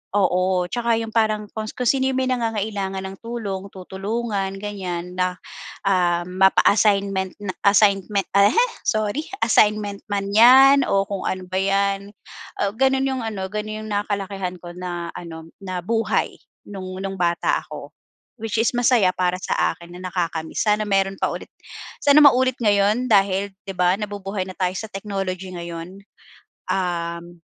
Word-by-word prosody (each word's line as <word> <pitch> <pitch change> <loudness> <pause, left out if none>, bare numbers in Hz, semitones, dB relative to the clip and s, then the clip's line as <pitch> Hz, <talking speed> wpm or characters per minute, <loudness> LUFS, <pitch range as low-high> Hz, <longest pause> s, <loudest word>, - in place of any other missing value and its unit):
oo, 185 -1 +2
'tsaka 235 -1 +1
'yong 225 -1 -5
parang 215 -2 +1
kung 215 -1 -3
kung 250 - -4
sino 265 -1 +2
'yong - - -3
may 260 0 0
nangangailangan 210 -5 -2
ng 190 0 -7
tulong, 205 -5 -4
tutulungan 195 +1 -3
ganyan, 180 -4 -5
na 180 0 0 0.5
ah, 175 -2 +2
mapa-assignment 195 0 +3
na 195 -2 -4
assignment 200 0 +3
ahe! 200 +3 +5 0.3
Sorry, 215 +7 0 0.2
assignment 210 -2 +2
man 200 0 -1
'yan, 265 +4 +8
o 195 0 +2
kung 195 -2 -3
ano 185 0 -2
ba 185 +1 -1
'yan. 200 0 0 0.7
Gano'n 265 +1 +2
'yong 260 -2 -2
ano, 205 -4 -3
gano'n 215 +1 -4
'yong - - -7
nakalakihan 195 -2 -2
ko 175 -1 -8
na 175 -2 -5
ano, 165 -1 -9
na 185 -2 -4
buhay, 225 +1 0 0.3
no'ng 185 -2 -7
no'ng 195 0 -4
bata 170 -1 +1
ako. - - -9 0.5
Which 225 0 -2
is 230 - +2
masaya 240 -6 +4
para 180 0 0
sa - - -1 0.2
akin 170 0 -14
na 185 0 -6
nakaka-miss, 165 -1 -2
sana 210 0 +3
meron 195 -1 +1
pa - - +2
ulit, - - -7 0.5
sana 285 +1 +7
maulit 260 -2 +4
ngayon 210 +3 +3
dahil, 195 0 +2
'di 195 - -4
ba, 180 0 +3
nabubuhay 200 -2 -4
na 185 - -10
tayo 185 -1 0
sa 220 +3 -5
technology 195 -2 -4
ngayon? 170 +2 -7 0.7
Um, 170 -2 -3
195 Hz, 150 wpm, -22 LUFS, 185-215 Hz, 0.7 s, yan